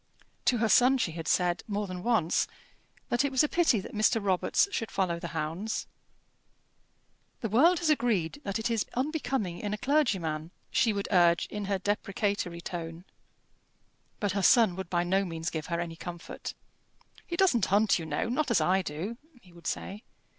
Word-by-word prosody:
To 245 Hz, -, +3 dB
her 225 Hz, 0 st, +2 dB
son 250 Hz, +5 st, +5 dB
she 210 Hz, -9 st, 0 dB
had 165 Hz, 0 st, -6 dB
said, 175 Hz, -1 st, +2 dB
more 205 Hz, 0 st, -2 dB
than 185 Hz, -2 st, -6 dB
once, 210 Hz, -7 st, +2 dB, 0.6 s
that 240 Hz, +3 st, +2 dB
it 280 Hz, -, 0 dB
was 265 Hz, +2 st, +4 dB
a -, -, +3 dB
pity 320 Hz, -9 st, +3 dB
that -, -, -10 dB
Mr. 215 Hz, +2 st, +3 dB
Robarts 195 Hz, -, +2 dB
should 225 Hz, -, -2 dB
follow 175 Hz, -3 st, -1 dB
the 170 Hz, -, -5 dB
hounds. 165 Hz, +8 st, -3 dB, 1.6 s
"The 225 Hz, -, -2 dB
world 320 Hz, -, +5 dB
has 325 Hz, -3 st, +1 dB
agreed 235 Hz, -, 0 dB
that 200 Hz, -4 st, -2 dB
it 225 Hz, +1 st, -2 dB
is 225 Hz, -3 st, 0 dB
unbecoming 260 Hz, -, -1 dB
in 210 Hz, 0 st, -2 dB
a -, -, -9 dB
clergyman," 195 Hz, -, 0 dB, 0.2 s
she 255 Hz, -3 st, +3 dB
would 200 Hz, -1 st, -3 dB
urge, 175 Hz, -3 st, +4 dB
in 210 Hz, -1 st, -4 dB
her 200 Hz, 0 st, 0 dB
deprecatory 200 Hz, -2 st, -2 dB
tone. 170 Hz, 0 st, -6 dB, 1.1 s
But 205 Hz, -2 st, 0 dB
her 200 Hz, +2 st, -1 dB
son 220 Hz, -1 st, +5 dB
would 190 Hz, -2 st, -6 dB
by 175 Hz, -1 st, +1 dB
no 190 Hz, +3 st, +1 dB
means 165 Hz, -2 st, -4 dB
give 160 Hz, -1 st, -4 dB
her 170 Hz, -1 st, -2 dB
any 165 Hz, -1 st, -4 dB
comfort. 175 Hz, 0 st, -7 dB, 0.7 s
"He 340 Hz, -, -4 dB
doesn't 300 Hz, -, +3 dB
hunt, 205 Hz, 0 st, +3 dB
you 160 Hz, -, -6 dB
know 150 Hz, +7 st, -1 dB
not 260 Hz, +4 st, 0 dB
as 235 Hz, -, +3 dB
I 190 Hz, +1 st, +2 dB
do," 180 Hz, +8 st, -5 dB, 0.2 s
he 180 Hz, -6 st, -20 dB
would 170 Hz, -1 st, -10 dB
say. 200 Hz, +3 st, -4 dB
200 Hz, 185 wpm, -29 LUFS, 175-235 Hz, 1.6 s, son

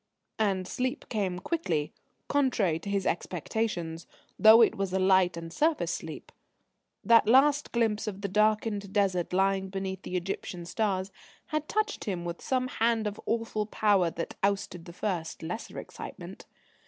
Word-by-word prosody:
And 195 Hz, -4 st, +1 dB
sleep 255 Hz, +7 st, -3 dB
came 195 Hz, -5 st, -1 dB
quickly, 170 Hz, -, -2 dB, 0.3 s
contrary 230 Hz, -, +1 dB
to 185 Hz, -, -7 dB
his 200 Hz, -2 st, 0 dB
expectations, 175 Hz, -1 st, -2 dB, 0.3 s
though 220 Hz, +1 st, +9 dB
it -, -, +3 dB
was 195 Hz, -1 st, -2 dB
a -, -, +2 dB
light 185 Hz, -2 st, +3 dB
and 165 Hz, 0 st, -7 dB
surface 310 Hz, -, +1 dB
sleep. -, -, -7 dB, 0.7 s
That 230 Hz, -2 st, +5 dB
last 285 Hz, +4 st, +4 dB
glimpse 225 Hz, -3 st, 0 dB
of 200 Hz, -1 st, -5 dB
the 200 Hz, -, -1 dB
darkened 210 Hz, 0 st, +1 dB
Desert 190 Hz, -4 st, +1 dB
lying 190 Hz, +1 st, +1 dB
beneath 190 Hz, -1 st, -4 dB
the 185 Hz, -, -6 dB
Egyptian 180 Hz, -1 st, -4 dB
stars 190 Hz, 0 st, -1 dB, 0.4 s
had 305 Hz, 0 st, -2 dB
touched 430 Hz, 0 st, -1 dB
him 180 Hz, -4 st, -3 dB
with 170 Hz, 0 st, -5 dB
some 255 Hz, -1 st, 0 dB
hand 230 Hz, -2 st, +1 dB
of 210 Hz, 0 st, -4 dB
awful 225 Hz, -2 st, -1 dB
power 205 Hz, -5 st, +3 dB
that 165 Hz, 0 st, -5 dB
ousted 195 Hz, -4 st, -1 dB
the 170 Hz, -, -9 dB
first, 175 Hz, -4 st, -3 dB
lesser 180 Hz, +8 st, -5 dB
excitement. -, -, -9 dB
200 Hz, 155 wpm, -29 LUFS, 180-225 Hz, 0.7 s, though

